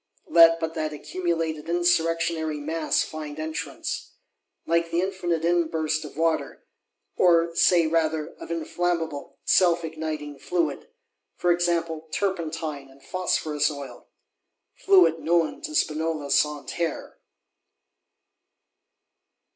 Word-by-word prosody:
Let 165 Hz, 0 st, +7 dB
but 160 Hz, 0 st, -3 dB
that 155 Hz, -2 st, -3 dB
accumulated 165 Hz, -1 st, -3 dB
insurrectionary 165 Hz, -2 st, +1 dB
mass 160 Hz, +2 st, 0 dB
find 155 Hz, -1 st, -7 dB
entrance! 155 Hz, -, -5 dB, 0.5 s
Like 170 Hz, 0 st, +1 dB
the 165 Hz, +1 st, 0 dB
infinite 175 Hz, -3 st, -1 dB
inburst 160 Hz, -2 st, +1 dB
of 150 Hz, -1 st, -10 dB
water; 165 Hz, 0 st, -1 dB, 0.5 s
or 170 Hz, -1 st, +4 dB
say 175 Hz, -1 st, +5 dB
rather, 160 Hz, -1 st, 0 dB
of -, -, -9 dB
inflammable, 165 Hz, -2 st, -2 dB
self 175 Hz, -2 st, +4 dB
igniting 155 Hz, -3 st, -5 dB
fluid; 165 Hz, -3 st, -2 dB, 0.5 s
for 175 Hz, -, +1 dB
example, 170 Hz, -2 st, 0 dB
"turpentine 160 Hz, -7 st, -3 dB
and 135 Hz, 0 st, -20 dB
phosphorus 155 Hz, -5 st, 0 dB
oil,"—fluid 165 Hz, -, -1 dB
known 170 Hz, -, +1 dB
to 310 Hz, -1 st, -6 dB
Spinola 155 Hz, -, -1 dB
Santerre! 150 Hz, +3 st, -1 dB
165 Hz, 100 wpm, -25 LUFS, 155-170 Hz, 0.5 s, Let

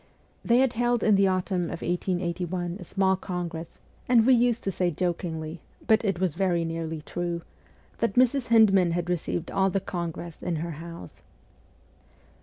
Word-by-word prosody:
They 235 Hz, -, +3 dB
had 260 Hz, -1 st, +3 dB
held 240 Hz, 0 st, +1 dB
in 215 Hz, -, +4 dB
the 195 Hz, 0 st, +4 dB
autumn 185 Hz, -1 st, 0 dB
of 170 Hz, -, -6 dB
1881 175 Hz, 0 st, -2 dB
a -, -, -7 dB
small 190 Hz, -1 st, +1 dB
congress, 175 Hz, -3 st, -5 dB, 0.3 s
and 235 Hz, -3 st, +5 dB
we 260 Hz, -, +6 dB
used 240 Hz, -1 st, +2 dB
to 195 Hz, -, -1 dB
say 180 Hz, -1 st, 0 dB
jokingly 165 Hz, -1 st, -3 dB, 0.2 s
but 220 Hz, 0 st, +4 dB
it 195 Hz, -5 st, 0 dB
was 185 Hz, -4 st, +1 dB
very 175 Hz, -2 st, +1 dB
nearly 165 Hz, -1 st, -4 dB
true 170 Hz, +1 st, -4 dB, 0.6 s
that 230 Hz, -4 st, 0 dB
Mrs. 255 Hz, +1 st, +3 dB
Hyndman 195 Hz, -6 st, +5 dB
had 175 Hz, +1 st, -1 dB
received 175 Hz, 0 st, -2 dB
all 195 Hz, 0 st, +2 dB
the 195 Hz, -, 0 dB
congress 170 Hz, -3 st, -5 dB
in 175 Hz, -, -2 dB
her 165 Hz, +2 st, -3 dB
house. 165 Hz, -, -10 dB
180 Hz, 165 wpm, -26 LUFS, 170-200 Hz, 0.6 s, we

